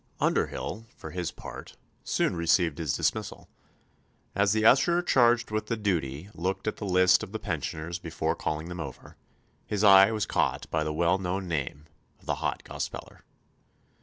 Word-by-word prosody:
Underhyll, 115 Hz, +1 st, -1 dB
for 80 Hz, -, -9 dB
his 90 Hz, -1 st, -3 dB
part, -, -, -10 dB, 0.3 s
soon -, -, 0 dB
received 85 Hz, -1 st, +2 dB
his 80 Hz, -5 st, -1 dB
dismissal. -, -, -2 dB, 0.9 s
As 100 Hz, 0 st, +2 dB
the 110 Hz, 0 st, +1 dB
usher 170 Hz, +9 st, +5 dB
charged 120 Hz, -7 st, +3 dB
with 110 Hz, 0 st, -2 dB
the 115 Hz, -, -1 dB
duty 85 Hz, -6 st, -2 dB
looked 95 Hz, +3 st, -3 dB
at 110 Hz, -, -1 dB
the 105 Hz, -, -5 dB
list 90 Hz, -1 st, +5 dB
of 95 Hz, -, -7 dB
the -, -, -1 dB
pensioners 85 Hz, -3 st, -4 dB
before 80 Hz, -2 st, -2 dB
calling 80 Hz, +1 st, -3 dB
them 90 Hz, 0 st, -7 dB
over, 70 Hz, -6 st, -8 dB, 0.5 s
his 105 Hz, 0 st, -1 dB
eye 95 Hz, -1 st, +8 dB
was 110 Hz, -3 st, -1 dB
caught -, -, 0 dB
by 80 Hz, -1 st, +1 dB
the 75 Hz, -, -2 dB
well 85 Hz, +4 st, +2 dB
known 95 Hz, +1 st, -3 dB
name 75 Hz, -2 st, -3 dB, 0.3 s
of -, -, -23 dB
the -, -, 0 dB
Hot -, -, -2 dB
Gospeller. -, -, -7 dB
90 Hz, 165 wpm, -28 LUFS, 80-105 Hz, 0.9 s, eye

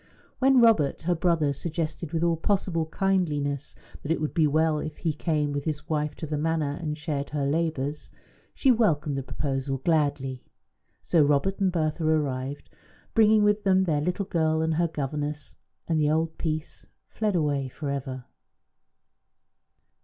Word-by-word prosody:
When 270 Hz, 0 st, +5 dB
Robert, 215 Hz, -14 st, +3 dB
her 175 Hz, +2 st, +2 dB
brother, 165 Hz, -4 st, +1 dB
suggested, 160 Hz, +1 st, -4 dB
with 165 Hz, 0 st, 0 dB
all 170 Hz, -1 st, +3 dB
possible 165 Hz, -2 st, 0 dB
kindliness, 150 Hz, -7 st, -1 dB, 0.3 s
that 145 Hz, -, -4 dB
it 165 Hz, -, +1 dB
would 155 Hz, -1 st, -2 dB
be 160 Hz, -3 st, +3 dB
well 155 Hz, +1 st, +2 dB
if 155 Hz, 0 st, -5 dB
he 160 Hz, -3 st, -1 dB
came 150 Hz, -2 st, -1 dB
with 145 Hz, -1 st, -3 dB
his 155 Hz, -2 st, -3 dB
wife 150 Hz, -1 st, -1 dB
to -, -, -6 dB
the 150 Hz, -1 st, -3 dB
Manor 155 Hz, -2 st, 0 dB
and 150 Hz, -2 st, -3 dB
shared 150 Hz, -3 st, -3 dB
her 145 Hz, -2 st, -1 dB
labours, 150 Hz, -1 st, -2 dB, 0.4 s
she 270 Hz, -, +4 dB
welcomed 160 Hz, -, +2 dB
the 135 Hz, -, -2 dB
proposal 135 Hz, 0 st, -3 dB
gladly. 140 Hz, -3 st, 0 dB, 0.6 s
So 170 Hz, -, +3 dB
Robert 145 Hz, +7 st, +1 dB
and 190 Hz, -2 st, +2 dB
Bertha 160 Hz, -1 st, -1 dB
arrived, 145 Hz, -3 st, -1 dB, 0.4 s
bringing 215 Hz, -1 st, +5 dB
with 210 Hz, 0 st, +2 dB
them 190 Hz, -1 st, +4 dB
their 155 Hz, -5 st, +1 dB
little 180 Hz, +5 st, -1 dB
girl 160 Hz, -3 st, +1 dB
and 160 Hz, 0 st, +1 dB
her 170 Hz, +2 st, +2 dB
governess; 145 Hz, -1 st, -4 dB, 0.3 s
and 160 Hz, -2 st, +1 dB
the 150 Hz, -, +3 dB
old 160 Hz, +1 st, 0 dB
peace 155 Hz, -1 st, -4 dB, 0.2 s
fled 210 Hz, -3 st, -1 dB
away 145 Hz, -4 st, 0 dB
for 140 Hz, +2 st, -5 dB
ever. 130 Hz, -2 st, -5 dB
155 Hz, 160 wpm, -26 LUFS, 145-170 Hz, 0.6 s, When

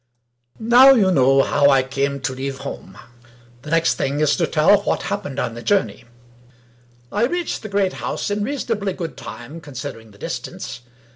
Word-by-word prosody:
Now 245 Hz, +4 st, +7 dB
you 195 Hz, -6 st, +3 dB
know 135 Hz, -3 st, +4 dB
how 145 Hz, -1 st, +3 dB
I 135 Hz, -2 st, +4 dB
came 140 Hz, +1 st, -2 dB
to 130 Hz, -, -2 dB
leave 135 Hz, +1 st, -4 dB
home. 95 Hz, +1 st, -8 dB, 0.6 s
The 150 Hz, -, -10 dB
next 165 Hz, +1 st, +2 dB
thing 140 Hz, +1 st, -1 dB
to 160 Hz, +3 st, +1 dB
tell 165 Hz, +6 st, +4 dB
is, -, -, -12 dB
what -, -, 0 dB
happened 145 Hz, -10 st, -4 dB
on 125 Hz, -4 st, -2 dB
the 120 Hz, -, -8 dB
journey. 200 Hz, +8 st, 0 dB, 1.1 s
I 210 Hz, +3 st, +1 dB
reached 350 Hz, +5 st, -2 dB
the 215 Hz, -, -7 dB
great 195 Hz, -2 st, +1 dB
house -, -, -4 dB
in 205 Hz, 0 st, -1 dB
reasonably 225 Hz, -6 st, -2 dB
good 165 Hz, -7 st, -6 dB
time 125 Hz, +10 st, -9 dB
con 145 Hz, -4 st, -13 dB
sidering 115 Hz, -3 st, -7 dB
the 100 Hz, -, -18 dB
distance. 120 Hz, -, -6 dB
155 Hz, 180 wpm, -21 LUFS, 135-205 Hz, 1.1 s, Now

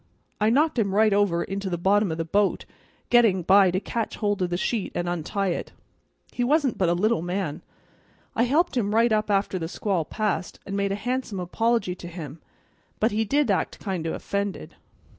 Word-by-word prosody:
I 215 Hz, +1 st, +3 dB
knocked 290 Hz, +2 st, +2 dB
him 200 Hz, -3 st, 0 dB
right 215 Hz, 0 st, +4 dB
over 195 Hz, -4 st, +2 dB
into 195 Hz, 0 st, -4 dB
the 175 Hz, -, -2 dB
bottom 195 Hz, +2 st, +2 dB
o' -, -, -2 dB
the 165 Hz, 0 st, -3 dB
bo't, 200 Hz, +4 st, +1 dB, 0.5 s
getting 225 Hz, -7 st, +4 dB
by 195 Hz, +2 st, +6 dB
to 185 Hz, +1 st, 0 dB
catch 225 Hz, +2 st, -3 dB
hold 205 Hz, -2 st, -1 dB
of 180 Hz, -, 0 dB
the 175 Hz, -, -1 dB
sheet 210 Hz, +1 st, -2 dB
an' 175 Hz, -, -1 dB
untie 175 Hz, +3 st, -1 dB
it. 170 Hz, -, -4 dB, 0.6 s
He 245 Hz, -, -2 dB
wasn't 280 Hz, 0 st, +1 dB
but 185 Hz, -3 st, +3 dB
a 170 Hz, -, +2 dB
little 210 Hz, 0 st, +1 dB
man; 175 Hz, -3 st, -3 dB, 0.7 s
I 235 Hz, -, +3 dB
helped 305 Hz, +6 st, +1 dB
him 210 Hz, -3 st, 0 dB
right 230 Hz, +1 st, +4 dB
up 215 Hz, 0 st, +1 dB
after 195 Hz, -2 st, +1 dB
the 165 Hz, -, -3 dB
squall 185 Hz, -1 st, -1 dB
passed, 195 Hz, +1 st, -3 dB
and 195 Hz, -, -4 dB
made 200 Hz, 0 st, 0 dB
a -, -, 0 dB
handsome 245 Hz, -2 st, -3 dB
apology 225 Hz, +2 st, 0 dB
to 180 Hz, -1 st, -9 dB
him, 160 Hz, -3 st, -8 dB, 0.6 s
but 220 Hz, -, +2 dB
he 220 Hz, +2 st, 0 dB
did 280 Hz, +1 st, +2 dB
act 190 Hz, -, -1 dB
kind 185 Hz, -5 st, -3 dB
o' -, -, -2 dB
offended." 200 Hz, -1 st, -4 dB
200 Hz, 200 wpm, -25 LUFS, 180-225 Hz, 0.7 s, by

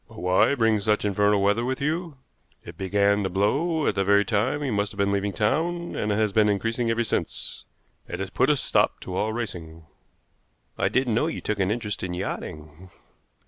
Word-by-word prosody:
"But -, -, -15 dB
why 90 Hz, +9 st, +3 dB
bring 115 Hz, -4 st, +2 dB
such 105 Hz, +1 st, +1 dB
infernal 105 Hz, 0 st, +2 dB
weather 105 Hz, +4 st, +2 dB
with 130 Hz, +1 st, -2 dB
you? 160 Hz, +1 st, -2 dB, 0.5 s
It 85 Hz, -, -9 dB
began 100 Hz, +2 st, +1 dB
to 95 Hz, -, -1 dB
blow 145 Hz, -, +1 dB
at -, -, +2 dB
the 100 Hz, -, 0 dB
very 100 Hz, +1 st, +4 dB
time 125 Hz, +7 st, 0 dB
you 135 Hz, -, -1 dB
must 100 Hz, 0 st, 0 dB
have 100 Hz, -, -13 dB
been 100 Hz, 0 st, +1 dB
leaving 100 Hz, 0 st, 0 dB
town, 165 Hz, -, -1 dB
and 105 Hz, -, -1 dB
has 105 Hz, -1 st, +1 dB
been 105 Hz, 0 st, +4 dB
increasing 115 Hz, +4 st, 0 dB
ever 115 Hz, +1 st, +1 dB
since. 110 Hz, -, -3 dB, 0.4 s
It -, -, -6 dB
has 95 Hz, -1 st, -4 dB
put 130 Hz, +2 st, +2 dB
a 150 Hz, -, +4 dB
stop 135 Hz, -, +1 dB
to 90 Hz, -, -6 dB
all 105 Hz, +3 st, 0 dB
racing." 85 Hz, -8 st, -6 dB, 0.9 s
"I -, -, 0 dB
didn't 130 Hz, -3 st, +1 dB
know 120 Hz, +8 st, +2 dB
you 165 Hz, -, -3 dB
took 105 Hz, -1 st, -3 dB
an 95 Hz, -1 st, +1 dB
interest 105 Hz, -1 st, -3 dB
in 90 Hz, -1 st, -3 dB
yachting." 80 Hz, -1 st, -6 dB
105 Hz, 200 wpm, -25 LUFS, 100-120 Hz, 0.9 s, very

